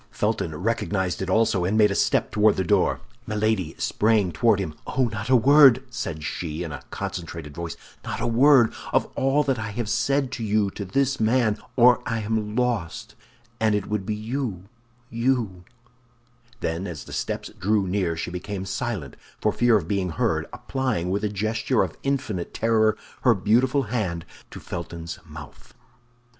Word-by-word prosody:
Felton 80 - -1
recognized 95 -1 -1
it 95 - -3
also, 105 -2 +2
and 100 +5 +1
made 105 -2 +5
a - - +1
step - - +1
toward 105 0 +4
the 95 - 0
door. 85 - +2 0.3
Milady 105 -6 0
sprang 105 -4 +2
toward 115 +1 +3
him. 95 -6 -3
"Oh, 130 -2 +1
not 110 +2 -4
a 130 - +6
word," 135 0 +7
said 80 -10 -4
she 80 +1 -4
in 80 - -5
a 70 -3 -6
concentrated 85 -4 -6
voice, 85 +1 -6 0.3
"not - - -4
a - - -1
word 120 0 +5 0.2
of - - +3
all 135 +3 +2
that 130 -3 0
I 110 0 -4
have 110 +2 -4
said 135 +3 +1
to 125 -3 -4
you 105 -2 +1
to 100 - -6
this 135 +8 0
man, 110 -1 +2 0.2
or 125 0 +6
I 115 0 -1
am 105 0 -2
lost, 120 -9 -1 0.5
and 110 -1 +2
it 105 -1 -1
would 105 -2 -2
be 105 +2 -2
you—you—" 115 -1 -3 1.0
Then 85 +4 -2
as 80 -6 -6
the - - -11
steps - - -3
drew 100 +1 +2
near, 90 -3 -1
she 85 - -4
became 95 +2 -5
silent 95 - -4 0.2
for - - +2
fear 120 -2 +4
of 85 -6 -4
being 95 -2 0
heard, - - 0
applying, 120 -10 -2
with 100 +2 -1
a 105 - +1
gesture 110 +4 0
of - - -5
infinite 130 -10 -2
terror, 110 -1 +2 0.2
her 120 -3 +4
beautiful 125 +8 +2
hand 100 -8 -2 0.2
to - - -9
Felton's 85 -1 -6
mouth. 75 -1 -12
105 Hz, 170 wpm, -24 LUFS, 90-120 Hz, 1.0 s, word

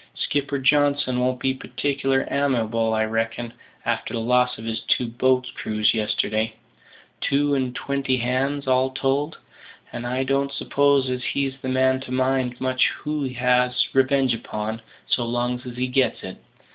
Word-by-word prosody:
Skipper 140 0 -1
Johnson 140 -2 +2
won't 125 0 0
be 130 - +1
partic'lar 135 0 -1
amiable, 115 -5 +1
I 110 0 +2
reckon, 115 +1 -2 0.3
a'ter 115 - -1
the - - -1
loss 125 +2 +2
of 110 - -9
his 115 0 -2
two 125 - 0
boats' 125 +2 +1
crews 105 0 0
yesterday 110 0 -1 0.7
two 145 +1 +2
and 130 -2 0
twenty 140 -1 -1
hands, 130 +4 -1
all 130 0 +3
told; 135 +3 -1 0.6
and 120 0 -4
I 130 +2 0
don't 140 +1 0
suppose 140 -2 +2
as 125 0 -3
he's 140 -1 -1
the 130 - -3
man 130 0 +3
to 130 -1 -9
mind 130 -1 0
much 130 0 +2 0.2
who 150 0 -2
he 130 - -4
has 125 0 +2
his - - 0
revenge 135 -1 +3
upon, 110 -1 -4 0.2
so 120 - 0
long's 120 +2 -2
he 125 0 -3
gets 130 +1 +1
it. 95 - -7
130 Hz, 160 wpm, -23 LUFS, 120-135 Hz, 0.7 s, all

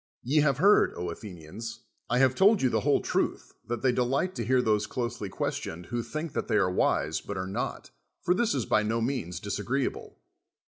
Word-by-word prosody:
Ye 135 +6 0
have 140 -4 +2
heard, 200 +7 +5
Athenians. 95 +5 -7 0.3
I 125 - +2
have 130 0 +4
told 200 +8 +5
yon 130 - +3
the - - +2
whole - - +2
truth - - -1
that 120 -1 -3
they 130 - +4
delight 130 +9 0
to 120 - -3
hear 130 +3 +3
those 105 -3 +1
closely 120 -4 -3
questioned 85 -2 -4
who 120 +6 -2
think 155 +5 -5
that - - -2
they 110 - +1
are 90 -3 +2
wise 80 -3 +1
but 100 - -6
are 95 - -2
not: 95 +2 -4 0.3
for 180 - +2
this 215 -4 +1
is 130 - -1
by 110 - +3
no 110 +2 0
means 115 -9 -2
disagreeable. 125 +7 -3
120 Hz, 195 wpm, -28 LUFS, 100-135 Hz, 0.3 s, heard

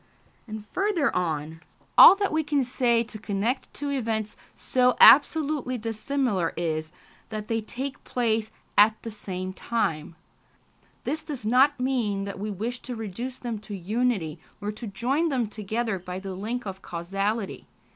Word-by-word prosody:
And 215 -1 -7
further 380 -7 +1
on: 160 -2 -2 0.3
"All - - +11
that 400 0 -1
we 315 0 +2
can 290 -2 +1
say 240 -2 +2
to 220 -1 -10
connect 215 +5 -2
two 285 0 -4
events 220 -5 -2 0.2
so 250 -1 +2
absolutely 285 -2 +6
dissimilar 225 - -1
is, 155 -2 -2 0.4
that 215 -1 -5
they 225 -1 0
take 265 +5 -5
place 225 -3 0 0.3
at 215 +1 +5
the 230 - -5
same 185 -3 -5
time.... 165 -8 -2 0.9
This 315 - -2
does 290 -8 -7
not 255 +5 +4
mean 240 -7 0
that 200 -1 -6
we 210 +2 -3
wish 225 +5 -4
to 250 -1 -6
reduce 230 +4 -5
them 235 -3 -4
to 210 -1 -7
unity, 195 -4 -1 0.2
or 205 0 -3
to 220 +2 -7
join 260 +11 0
them 255 -5 +1
together 215 0 -3
by 180 +1 -6
the 190 0 -6
link 225 +6 -4
of 190 -1 -6
causality 195 +5 -3
220 Hz, 155 wpm, -26 LUFS, 195-255 Hz, 0.9 s, All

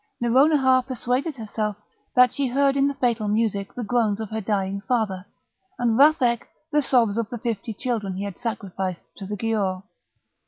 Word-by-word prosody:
Nouronihar 260 +2 +4
persuaded 260 +4 -1
herself 215 -3 -3 0.4
that 250 -1 +6
she 280 -1 0
heard 275 +2 +2
in 275 0 +3
the 280 - -2
fatal 235 -5 0
music 205 -2 0
the 245 - -4
groans 220 -2 +1
of 220 -1 -5
her 220 0 -2
dying 195 -1 -1
father, 205 -6 -1 0.5
and 235 -2 +1
Vathek 270 -4 +4 0.2
the 295 0 +3
sobs 230 -6 +2
of 225 -2 -2
the 240 - -5
fifty 225 -1 -3
children 215 -4 -3
he 195 - -4
had 200 -3 -7
sacrificed 190 -6 -4 0.2
to 195 - -7
the 210 +1 -4
Giaour. 200 -4 -1
225 Hz, 170 wpm, -24 LUFS, 205-255 Hz, 0.5 s, that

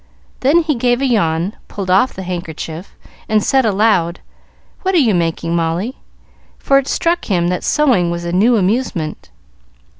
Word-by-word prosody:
Then 315 +6 +3
he 310 -1 0
gave 245 -1 +1
a 275 - 0
yawn, 180 -6 0
pulled 190 -3 -4
off 200 +8 +4
the 190 - -6
handkerchief, 170 -1 -6 0.3
and 215 -1 +2
said 265 -3 +2
aloud, 195 -5 +1 0.6
"What 380 0 0
are - - +5
you 245 -9 +3
making, 165 -1 -1
Molly?" 170 +9 -2 0.6
for 275 0 +3
it 275 - -5
struck 340 +1 0
him 175 -4 0
that 180 - -2
sewing 250 - +2
was 170 0 -4
a 170 - -3
new 220 +7 +3
amusement. 190 -6 -2
195 Hz, 160 wpm, -17 LUFS, 170-250 Hz, 0.6 s, are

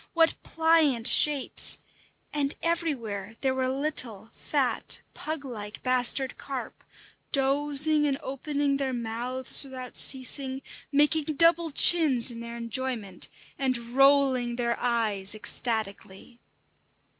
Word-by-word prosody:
What 330 -1 +3
pliant 320 -7 +1
shapes! 290 0 +4 0.6
And 285 -1 -2
everywhere 235 - -3
there 265 -1 0
were 260 0 -2
little, 255 -6 -4
fat, - - -1
pug 310 -2 -6
like 210 -4 -8
bastard 255 +1 +2
carp, 270 -3 -7 0.5
dozing 290 +2 +2
and 275 -1 -1
opening 280 +1 -2
their 270 -2 -3
mouths 240 +3 +1
without 255 -2 -9
ceasing, 265 0 0 0.3
making 295 +2 +2
double 335 +2 +3
chins 280 -5 +5
in 230 - -10
their 235 0 -8
enjoyment, 230 -5 -4 0.3
and 260 -2 0
rolling 255 0 +2
their 235 -1 -1
eyes 215 -5 -2
ecstatically. 215 -1 -4
260 Hz, 110 wpm, -26 LUFS, 235-285 Hz, 0.6 s, chins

